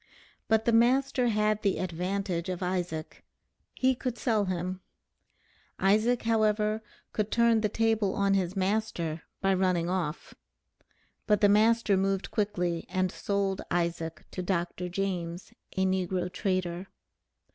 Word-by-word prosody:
But 220 0 +2
the 235 - +3
master 250 +2 +3
had 215 -1 +1
the 200 -2 +1
advantage 185 0 -2
of 185 0 -3
Isaac, 175 -3 -3 0.5
he 260 0 +3
could 250 -1 -4
sell 220 -3 +1
him. 185 0 -3 1.0
Isaac, 215 +5 +2
however, 215 -1 +2 0.3
could 210 -1 -1
turn 235 -1 +3
the 210 - +1
table 220 -2 +1
on 200 0 +2
his 190 -1 0
master, 185 -5 -1 0.2
by 195 -1 +3
running 180 -2 +1
off. 170 -4 -3 0.9
But 210 -1 +3
the 205 - +6
master 215 0 +4
moved 195 0 0
quickly 180 -6 -1
and 185 0 0
sold 200 -1 -1
Isaac 170 -2 -2
to 185 - -4
Dr. 180 -1 -2
James, 180 -2 -3 0.2
a 190 - +3
negro 185 -1 -1
trader. 185 -1 -2
195 Hz, 130 wpm, -29 LUFS, 180-215 Hz, 1.0 s, the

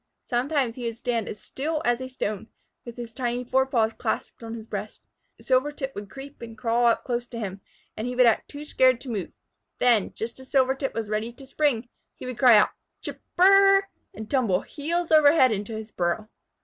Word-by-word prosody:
Sometimes 255 0 0
he 245 0 -7
would 230 -1 -3
stand 235 -2 -2
as 210 - -7
still 305 +3 -3
as 240 +1 +2
a 260 - -5
stone, 215 -5 -4 0.4
with 235 0 -9
his 235 -2 -7
tiny 245 -1 -2
fore 265 +2 +2
paws 225 -4 +1
clasped - - -3
on 230 0 -6
his 220 -1 -8
breast. 210 -1 -6 0.4
Silvertip 270 +1 0
would 205 -1 -7
creep 275 0 -11
and 225 -1 -9
crawl 235 +1 +2
up 230 - +2
close 240 -1 -2
to 240 - -8
him, 195 -3 -5 0.3
and 220 - -4
he 250 - -3
would 250 0 +5
act 230 - +2
too 290 +1 -8
scared 255 -4 +3
to 260 - -6
move. 200 -5 -4 0.5
Then, 235 -5 +3
just 230 +3 -5
as 260 - -13
Silvertip 265 0 +1
was 225 -2 -2
ready 215 +2 -2
to 270 +3 -13
spring, 265 -4 0 0.3
he - - -10
would 250 -2 -6
cry 245 -4 +8
out, 210 - +5 0.3
"Chip - - -7 0.2
r 360 - +6
r 390 0 +7
r!" 390 0 +1 0.3
and 220 - -7
tumble 225 -8 +1
heels 330 +3 -3
over 305 -2 +7
head 260 -6 +5
into 210 +1 -3
his 220 0 -7
burrow. 175 +5 -1
245 Hz, 215 wpm, -25 LUFS, 225-270 Hz, 0.5 s, cry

